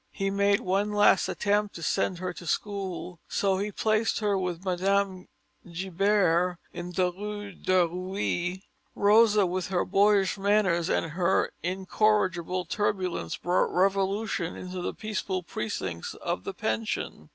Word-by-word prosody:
He 195 0 -2
made 200 0 +2
one 200 +3 0
last 205 -2 +4
attempt 205 0 0
to 165 - -7
send 185 +2 0
her 180 0 -4
to 175 - -10
school; 190 -3 -3
so 195 -1 +1
he 205 +1 -2
placed 215 +1 +1
her 205 -2 +1
with 180 -1 -3
Mme. 190 +1 0 0.5
Gibert 180 -1 +1 0.2
in 175 0 -6
the 180 0 +1
Rue 205 +2 -6
de 185 -1 +2
Reuilly. 185 +1 -3 0.3
Rosa 210 0 +5
with 180 0 -2
her 185 -2 0
boyish 200 0 +3
manners 195 -4 +2
and 165 - 0
her 180 +3 +1
incorrigible 185 -1 0
turbulence 185 - -1
brought 175 +2 +1
revolution 195 -1 0
into 180 0 -6
the - - -3
peaceful 210 -4 -3
precincts 95 - -4
of - - -4
the - - -4
pension. 110 -8 -3
190 Hz, 140 wpm, -27 LUFS, 180-205 Hz, 0.5 s, Rosa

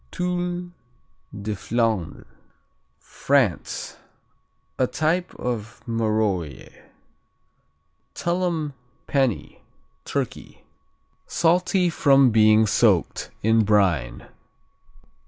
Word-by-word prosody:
Tuile 180 - -3 0.7
de 105 +1 -2
Flandre 115 -7 -2 0.7
France 135 -11 -1 0.8
A 130 - +3
type 170 +6 -1
of 115 -2 -5
Marolles. 105 - -2 1.4
Tullum 170 -4 -1 0.3
Penney 135 -6 -1 0.4
Turkey - - -5 0.6
Salty 180 +1 +2
from 135 -5 +4
being 110 0 +5
soaked 105 -4 +1
in 110 +1 +4
brine. 90 - +1
115 Hz, 65 wpm, -23 LUFS, 105-165 Hz, 1.4 s, being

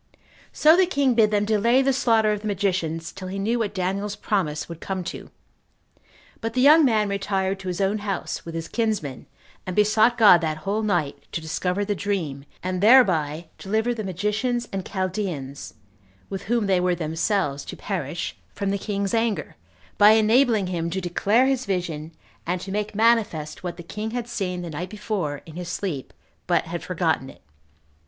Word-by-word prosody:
So 310 +2 +5
the 370 0 +4
king 280 -7 +2
bid 225 -2 +4
them 210 -1 +1
delay 230 +5 +3
the 270 0 +2
slaughter 225 -4 +3
of 210 -1 -2
the 215 - -4
magicians 175 -5 -1
till 190 -1 -8
he 190 +2 -5
knew 225 +5 0
what 215 -3 -2
Daniel's 195 +2 -2
promise 155 -10 -1
would 170 -1 -8
come 190 -1 -3
to; - - -7 1.1
but 225 0 -4
the 255 - +2
young 305 +4 +7
man 220 -6 +3
retired 195 -1 -1
to 190 - -8
his 180 -1 -3
own 200 +2 +1
house, 200 -2 -3
with 165 -1 -7
his 165 0 -4
kinsmen, 210 - -2 0.4
and 185 - -5
besought 215 +3 +4
God 200 -6 +7
that 155 -2 -1
whole 205 +3 0
night 175 -9 -1
to - - -1
discover 180 +5 -2
the 205 - 0
dream, 170 -10 -3 0.2
and 185 0 -2
thereby 175 - +4
deliver 220 +4 0
the 220 -2 -5
magicians 210 +6 -1
and 195 -1 -2
Chaldeans, 185 -8 -4 0.6
with 195 0 -5
whom 230 0 +1
they 190 -2 +3
were 180 0 +1
themselves 160 -2 -1
to - - -8
perish, 170 -4 -4 0.2
from 200 -1 -1
the 200 - -1
king's 200 -1 -2
anger, 225 -2 0 0.4
by 210 +1 +8
enabling 220 -1 +4
him 170 -2 -2
to 185 +3 -2
declare 200 +7 +2
his 265 -3 0
vision, 165 -5 -3 0.4
and 180 +1 0
to 190 - -6
make 210 +1 -3
manifest 215 -9 +1
what 175 -1 -4
the 175 - -8
king 210 +5 -5
had 240 0 -4
seen 180 -6 -3
the 170 - -6
night 175 +4 -5
before 190 -9 -3
in 160 - -12
his 175 0 -5
sleep, 175 -8 -4 0.4
but - - +2
had - - -5
forgotten - - -1
it. - - -16
195 Hz, 185 wpm, -24 LUFS, 175-220 Hz, 1.1 s, by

